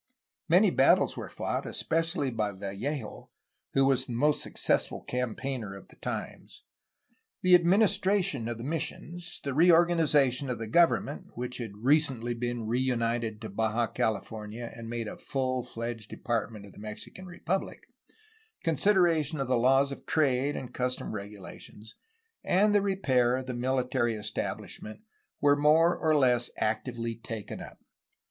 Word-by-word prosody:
Many - - +5
battles - - +4
were - - -6
fought, - - -3
especially 165 -4 0
by 105 -3 -1
Vallejo, 105 +6 -5 0.4
who 135 0 +4
was 135 -2 +2
the 120 - -5
most 145 +5 +2
successful - - 0
campaigner 125 -3 -3
of 100 - -13
the - - -18
times. - - -6 0.8
The 185 0 +5
administration 190 - +3
of 120 -1 -3
the 115 - -7
mis 155 +3 -1
sions, 175 0 -5
the 140 - -2
reorganization 160 -5 +4
of 125 - -2
the 115 - -5
government 150 +1 +1
(which 125 +1 -4
had 110 -4 -6
recently 130 -4 +2
been 120 -1 -3
re 120 +3 0
united 115 -3 -1
to 110 - -6
Baja 110 +3 0
California 110 +2 -3
and 115 -1 -8
made 115 -1 -3
a - - -7
full 130 -2 -1
fledged 115 -2 -6
department 115 -4 -3
of 100 - -13
the - - -15
Mexican 110 - -9
Republic), 180 +1 -3 0.8
consideration 165 -2 +2
of 135 - -1
the 130 - +2
laws 135 +3 +3
of 140 - -9
trade 140 -2 +2
and 125 -1 -6
customs 125 -2 -2
regulations, 105 +1 -9 0.5
and 205 +3 +3
the 205 - +4
repair 130 -12 +2
of 130 0 -4
the 130 - -4
military 125 -1 0
establishment 105 - -5 0.4
were 145 0 +5
more 155 +4 +4
or 155 -1 +2
less 125 -4 +3
actively 115 +1 -2
taken 115 -2 -7
up. - - -10
125 Hz, 145 wpm, -29 LUFS, 115-155 Hz, 0.8 s, Many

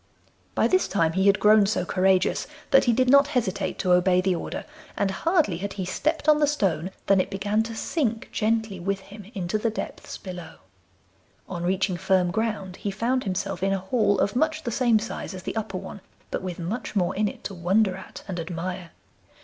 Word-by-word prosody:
By - - +3
this 370 0 +2
time 165 -5 +1
he 190 +2 +2
had 200 0 +5
grown 210 -1 +6
so 190 -3 0
courageous 185 +1 +2 0.2
that 270 - +6
he 240 - +4
did 255 +2 +2
not 280 +2 +6
hesitate 195 -4 -1
to 180 -1 +2
obey 180 0 +4
the 185 0 +2
order, 170 - -4 0.3
and 200 -1 +1
hardly 300 - +1
had 200 +1 -4
he 190 -2 -4
stepped 305 - -1
on 305 -1 +6
the 295 - +4
stone 190 - 0 0.2
than 195 -1 +4
it - - -4
began 205 +2 0
to 225 0 -4
sink 235 -3 -1
gently 220 -3 0
with 195 +2 -1
him 205 +1 -12
into 190 +3 -1
the 230 - +1
depths 220 - -6
below. 180 -4 -8 0.9
On 175 -2 -5
reaching 185 +1 0
firm 180 -1 +2
ground 210 -3 -2
he 205 - -3
found 235 +6 0
himself 185 -2 -2
in 195 0 +2
a - - +1
hall 205 +2 +1
of 200 - +1
much 315 +3 +1
the 235 - -2
same 235 -1 +3
size 215 -2 -5
as 185 - -8
the - - -4
upper 210 -4 -3
one, 190 +1 -8 0.3
but - - -2
with 185 -2 -5
much 195 +7 -4
more 180 -3 +1
in 210 +1 +1
it - - -7
to 200 - -5
wonder 190 +3 +2
at 190 - -10
and 180 -3 -4
admire. 175 +1 -4
195 Hz, 205 wpm, -25 LUFS, 185-225 Hz, 0.9 s, grown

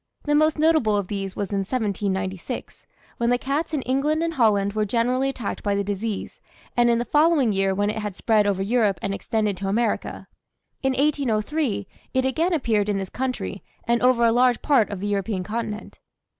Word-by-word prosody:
The 295 - 0
most 310 +1 +3
notable 305 -9 +3
of 200 -3 -3
these 195 -2 -4
was 200 0 -3
in 200 - 0
1796, 195 -1 -3 0.3
when 235 0 +1
the 245 - +3
cats 285 +6 -2
in 295 -5 -1
England 290 +5 +1
and 335 0 -1
Holland 205 -7 +2
were 215 0 0
generally 245 +5 +1
attacked 245 -6 -4
by 205 -1 0
the 200 - 0
disease, 205 +1 -4 0.3
and 240 0 +4
in 235 - +3
the 240 - -1
following 295 -6 +3
year 195 0 +1
when 205 +1 +1
it 220 - -4
had 210 -3 -4
spread 215 -1 +2
over 195 -1 0
Europe 210 -3 +2
and 195 - -1
extended 210 -1 -1
to 195 - -4
America; 220 +2 -1 0.6
in 265 -1 +1
1803, 270 -4 0 0.3
it 260 0 +2
again 320 +7 +1
appeared 225 - +1
in 205 - +1
this 190 -1 -4
country 260 0 -3 0.2
and 235 0 +1
over 250 -1 +4
a 230 - +5
large 245 0 +3
part 265 -8 +3
of 200 -2 -5
the 205 - -2
European 200 -1 -1
continent. 215 +1 -5
225 Hz, 195 wpm, -24 LUFS, 200-260 Hz, 0.6 s, a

